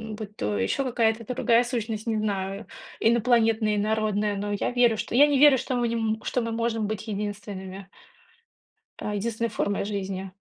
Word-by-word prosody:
будь 210 -1 -8
то 105 -1 -2
ещё 95 - 0
какая 235 -3 +2
то 230 +2 -6
другая 235 -2 +3
сущность, 230 -2 -3
не 220 -1 0
знаю, 200 0 -2 0.3
инопланетная, 225 -2 +3
инородная, 210 -1 0
но 205 +1 -3
я 205 +4 -1
верю 240 -3 +3
что - - -4
я 285 +4 +7
не 285 -2 +2
верю, 290 -2 +7
что 255 +1 -3
мы 240 -1 +1
н 220 -1 -1
что 250 - -1
мы 230 - -3
можем 225 -2 -1
быть 215 +1 -5
единственными. 200 -2 -5 1.1
А, 210 - -4
единственной 230 +2 -1
формой 205 -1 -1
жизни. 195 -2 -4
220 Hz, 170 wpm, -26 LUFS, 205-235 Hz, 1.1 s, я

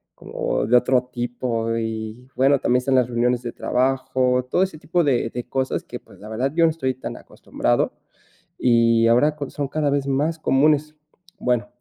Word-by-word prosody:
como - - -3
de 125 - +4
otro 125 +1 +3
tipo, 120 -2 -2
y, 110 +2 -5
bueno, 135 +2 +3
también 125 +1 +2
están 130 +1 0
las 125 -2 +3
reuniones 120 0 0
de 120 - -5
trabajo. 130 0 0
Todo 185 - +3
ese 185 -4 -4
tipo 175 +3 0
de 125 -5 +1
de 125 +1 -5
cosas 130 0 -2
que - - -7
pues, - - -19
la 105 - -11
verdad, 125 +5 -1
yo 165 0 +4
no 160 - +3
estoy 130 -5 -2
tan 130 - -7
acostumbrado, - - -2 0.6
y 115 -1 +3
ahora 135 +6 +3
con 140 -3 -5
son 145 -1 -3
cada 150 0 0
vez 140 -1 0
más 150 +4 0
comunes. 150 +1 +2 0.5
Bueno, 125 -1 0
125 Hz, 185 wpm, -22 LUFS, 120-140 Hz, 0.6 s, de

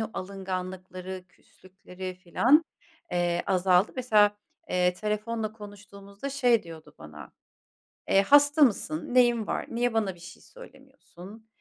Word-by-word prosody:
o 220 - -3
alınganlıkları, 185 -1 -6
küslükleri 185 0 -11
filan, 235 - +3 0.5
eee, 175 0 0
azaldı. 185 +1 +2
Mesela, 210 -5 +3 0.3
eee, 180 0 +2
telefonla 215 +2 -3
konuştuğumuzda 205 +2 -10
şey 245 -4 +2
diyordu 165 -2 -13
bana, 75 -2 -12 0.8
eee, 195 - +4
"Hasta 290 +6 +5
mısın? 200 - +1
Neyin 240 -3 +3
var? - - -3
Niye 240 0 -1
bana 210 -4 0
bir 175 - -19
şey 175 +2 -13
söylemiyorsun?" 270 - -15
200 Hz, 120 wpm, -27 LUFS, 185-230 Hz, 0.8 s, Hasta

